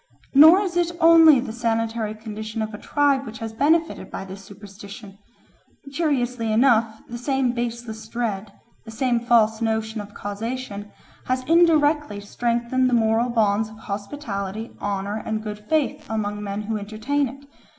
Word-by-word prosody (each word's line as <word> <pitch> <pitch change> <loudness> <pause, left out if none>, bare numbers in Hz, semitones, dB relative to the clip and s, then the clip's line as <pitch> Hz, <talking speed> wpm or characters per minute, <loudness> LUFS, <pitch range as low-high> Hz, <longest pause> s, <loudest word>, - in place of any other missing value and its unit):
Nor 315 +7 +8
is 370 -4 -3
it 345 -1 +1
only 325 -4 +7
the 240 -3 -5
sanitary 225 -2 -1
condition 220 0 -5
of 215 0 -6
a 210 - -7
tribe 285 -2 +1
which 220 -3 -8
has 225 0 -6
benefited 320 +7 +1
by - - -6
this 195 +1 -10
superstition; 200 0 -12 0.7
curiously 250 -7 -1
enough 225 -2 +2
the 240 0 -7
same 265 -1 0
baseless 235 -2 -5
dread, 220 -3 -3 0.3
the 225 - -12
same 240 +2 0
false 230 -2 +2
notion 220 -1 -1
of 205 0 -12
causation, 205 0 -5 0.4
has 255 0 0
indirectly 300 -7 +3
strengthened 240 +4 0
the 245 - +2
moral 225 +1 +2
bonds 215 -2 +1
of 215 - -13
hospitality, 205 -1 -5
honour, 200 +1 -2
and 220 0 -3
good 210 -1 -6
faith 310 -3 0
among 210 -2 -2
men 200 +1 -4
who 220 +1 -2
entertain 220 +8 -1
it. 275 +2 -13
225 Hz, 150 wpm, -23 LUFS, 215-260 Hz, 0.7 s, Nor